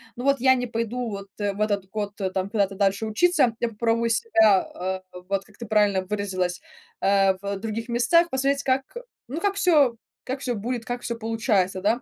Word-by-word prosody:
ну, 245 - -6
вот 275 0 +3
я 260 +1 +5
не 250 -1 -1
пойду 230 +1 -3
вот 200 -1 -6
в 205 0 -2
этот 200 -3 0
год, 205 0 -3
э, 190 - 0
там 190 +1 -2
куда-то 200 -3 +1
дальше 200 +2 +1
учиться, 255 0 +3
я 235 - 0
попробую 230 +1 0
себя, 220 - +4
а, 185 +1 -5 0.3
вот, 195 -1 -1
как 210 - -21
ты 235 - -7
правильно 205 -3 +3
выразилась, 185 -3 -2 0.4
а, 195 -1 +3
в 200 0 -3
других 225 +3 -5
местах 335 +9 +3
посмотреть, 275 +1 0
как, 265 0 +1 0.4
ну, 285 +6 -4
как 405 -1 +1
всё 300 -11 +4 0.3
как 260 +2 -3
всё 250 -3 -2
будет, 230 +2 -3
как 245 +1 -4
всё 235 - -3
получается, 220 -5 0
да. 225 +5 +1
220 Hz, 195 wpm, -24 LUFS, 200-250 Hz, 0.4 s, я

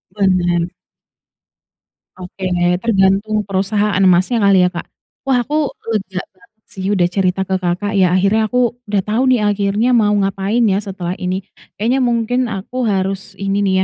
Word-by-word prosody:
Bener. 175 -4 +1 1.5
Oke, 185 +1 -6 0.3
tergantung 210 0 +1
perusahaan 200 +1 0
emasnya 185 +5 +3
kali 200 -3 +4
ya 180 - +3
Kak, 170 - -6 0.4
wah 250 -2 +2
aku 300 +2 0 0.2
lega 190 -3 -2
banget 190 +5 -25 0.2
sih 190 -4 -8
udah 185 -4 +2
cerita 185 +1 0
ke 190 - 0
Kakak 180 +4 -1
ya 185 -3 +3
akhirnya 200 +4 +2
aku 245 -2 +1 0.2
udah 200 -2 +2
tahu 220 +4 0
nih 250 - +3
akhirnya 205 +3 +1
mau 210 -3 +3
ngapain 195 +4 0
ya 190 - +2
setelah 185 -3 -5
ini. 185 +1 -2 0.3
Kayaknya 240 +6 0
mungkin 235 +1 0
aku 200 +5 -6
harus 195 0 -2
ini 195 0 -1
nih 190 - +1
195 Hz, 150 wpm, -17 LUFS, 185-215 Hz, 1.5 s, kali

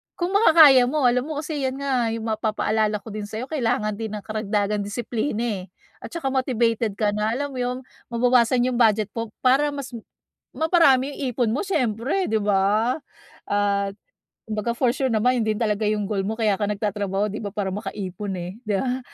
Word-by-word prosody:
kung 350 +1 -2
makakaya 315 - +7
mo 295 +2 0
alam 250 +2 +2
mo 310 - -4
kasi 295 -4 -2
yan 260 - -3
nga, 270 -4 0
yung 225 - -5
mapapaalala 215 0 0
ko 225 - -9
din 210 0 -5
sa 220 +3 -5
kailangan 235 -7 -1
din 220 -1 -4
ng 205 - -7
karagdagan 210 -1 -1
disiplina 220 +3 -2
eh, 200 -6 -3 0.3
at - - -8
tsaka 325 -6 -3
motivated 235 -5 0
ka 210 0 +1
na 210 +2 -1
alam 285 +2 -3
mo 260 - -6
yun, 250 0 -1 0.3
mabawasan 245 0 +3
yung 250 -1 0
budget 215 -3 +3
mo 230 0 -4 0.2
para 265 +3 +4
mas, 275 -2 -6 0.6
maparami 300 -5 +4
yung 285 - -9
ipon 240 -4 +1
mo 265 - -1
siyempre 260 - 0
'di 220 - +2
ba? 205 +4 +2 0.5
At, 200 -1 0 0.6
kumbaga 215 +1 -2
for 240 0 +2
sure 265 -2 0
naman 245 +3 +2
yun - - -3
din - - -6
talaga 215 -2 0
yung 210 -1 0
goal 200 -2 -1
mo 220 - -2
kaya 215 -4 +1
ka 205 - 0
nagtatrabaho 205 -1 -1
'di 215 - -5
ba, 205 - -4
para 195 -2 -1
makaipon, 200 -1 -5
eh 180 +4 -7
'di 210 - +1
ba? 255 0 -1
225 Hz, 190 wpm, -23 LUFS, 210-255 Hz, 0.6 s, makakaya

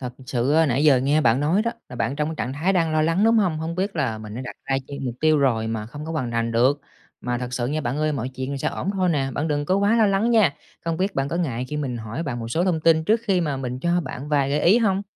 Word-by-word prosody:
Thật 125 -2 -5
sự 125 +2 0
á, 160 +1 +4
nãy 140 +2 +1
giờ 140 -4 +6
nghe 145 +4 +2
bạn 120 0 +3
nói 170 +8 +2
đó, 230 - 0 0.2
là 125 - -9
bạn 135 - -1
trong 150 +1 -1
cái 160 - -4
trạng 130 - -4
thái 160 +8 0
đang 165 -4 +1
lo 155 - +2
lắng, 165 +6 +2
đúng 225 +1 +4
hông? 180 -7 +1
Hông 160 +1 -4
biết 190 +1 -2
là 120 -7 -1
mình 105 0 -8
đã 125 - -5
đặt 125 - -7
ra 135 0 0
chen 140 -1 -6
mục 120 -2 -3
tiêu 155 -1 +4
rồi 120 -5 +1
mà 110 -1 -3
không 145 +6 -8
có 165 - -5
hoàn 130 -7 -2
thành 115 0 -1
được. 130 +5 +3 0.4
Mà 120 0 -2
thật 125 0 -5
sự 125 -1 -1
nha 150 +4 -1
bạn 125 -1 -2
ơi, 155 0 +1
mọi 130 -2 -3
chuyện 130 0 -6
rồi 140 - -3
sẽ 155 +3 0
ổn 195 - -3
thôi 185 -2 0
nè, 140 -5 0
bạn 155 +3 -1
đừng 145 -1 0
có 185 +6 +1
quá 205 +3 +3
lo 220 -2 +5
lắng 200 +4 +2
nha. 215 -11 +4 0.3
Không 165 -1 -1
biết 195 +3 -1
bạn 135 +1 -1
có 170 - -2
ngại 130 -8 -2
khi 150 - -4
mình 135 -5 -3
hỏi 115 +6 -5
bạn 135 -7 -4
một 115 - -5
số 165 +9 0
thông 175 -4 +1
tin 160 0 +3
trước 220 +4 +2
khi 190 -5 +2
mà 145 -5 -1
mình 125 -1 -4
cho 175 +3 +1
bạn 135 -2 -7
vài 140 -2 +1
gợi 145 +1 +1
ý 190 +9 +5
hông? 200 -4 +1
150 Hz, 315 wpm, -23 LUFS, 125-170 Hz, 0.4 s, giờ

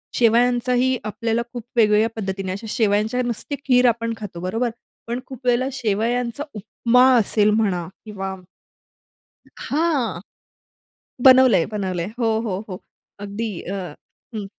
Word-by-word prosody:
शेवयाचाही 245 +2 +3
आपल्याला 225 +2 -1
खूप 240 - -6
वेगवेगळ्या 215 0 +4
पद्धतीने, 195 -3 -3
अशा 200 +4 -6
शेवयांच्या 215 +2 +1
नुसती 240 +4 -4
खीर 250 -1 +4
आपण 230 -1 0
खातो 200 -5 -8
बरोबर? 225 +7 -1 0.4
पण 240 +1 -2
खूप 260 -1 -11
वेळेला 245 +1 +2
शेवयांचा 235 +2 -1
उपमा 235 +4 +2
असेल 210 -1 +2
म्हणा 195 -6 0 0.2
किंवा 195 -3 -5 1.3
हां. 285 - 0 1.1
बनवलंय, 255 -9 +7
बनवलंय. 185 -4 -2
हो, 225 -2 +1
हो, 190 -2 -2
हो. 185 - -6 0.4
अगदी 205 +2 -4 0.2
अ - - -2 0.6
हं. 210 - -4
225 Hz, 120 wpm, -22 LUFS, 205-245 Hz, 1.3 s, बनवलंय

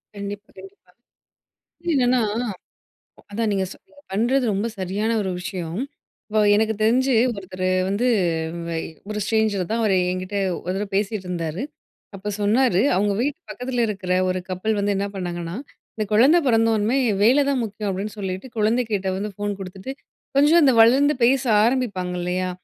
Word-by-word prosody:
கண்டிப்பா, 205 +1 -7
கண்டிப்பா 390 +1 -14 1.0
என்னன்னா, 250 -2 +3 1.1
அதான் 220 0 -1
நீங்க 190 -1 0
சொ - - -10 0.3
பண்ணுறது 245 +6 +1
ரொம்ப 200 +4 -1
சரியான 200 +5 -1
ஒரு 190 - -2
விஷயம். 180 0 -5 0.5
இப்போ 215 - +1 0.2
எனக்கு 220 +1 +2
தெரிஞ்சு 255 +4 +3 0.2
ஒருத்தரு 185 -1 -3 0.2
வந்து, 210 +6 +1 1.0
ஒரு 210 0 -3
ஸ்ட்ரேஞ்சர் 215 -4 +1
தான். 230 +1 0
அவர் 205 -3 +2 0.2
என்கிட்ட 185 +2 -4 0.3
ஒரு 180 +2 -2
தடவ 200 +1 -2
பேசிட்டு 200 -1 -1
இருந்தாரு. 170 +3 -3 0.5
அப்ப 195 +2 -5
சொன்னாரு 210 -1 +3
அவுங்க 200 +2 +2
வீட்டு 285 +2 -1
பக்கத்தில 250 -1 -3
இருக்கிற 190 -3 -4 0.2
ஒரு 185 - -1
கப்புள் 210 +4 -1
வந்து 200 0 +1
என்ன 200 +1 -1
பண்ணாங்கன்னா, 175 -1 -4 0.4
இந்த 215 -1 -2
குழந்தை 270 +11 +6
பிறந்ததோன்ம்மே 225 0 +2 0.3
வேல 265 +6 +5
தான் 265 -3 +1
முக்கியம் 210 -1 -5
அப்பிடின்னு 195 +3 -4
சொல்லிட்டு 190 +4 -4
குழந்தை 220 +3 +2
கிட்ட 195 -2 -1
வந்து, 205 +1 -4
ஃபோன் 205 0 -2
கொடுத்துட்டு 190 +7 -7 0.4
கொஞ்சம் 310 +4 +6
இந்த 265 -3 +5
வளர்ந்து 275 +6 +5
பேச 260 +2 +4 0.2
ஆரம்பிப்பாங்க 215 -7 0
இல்லயா! 180 +1 -1
210 Hz, 145 wpm, -22 LUFS, 190-240 Hz, 1.1 s, குழந்தை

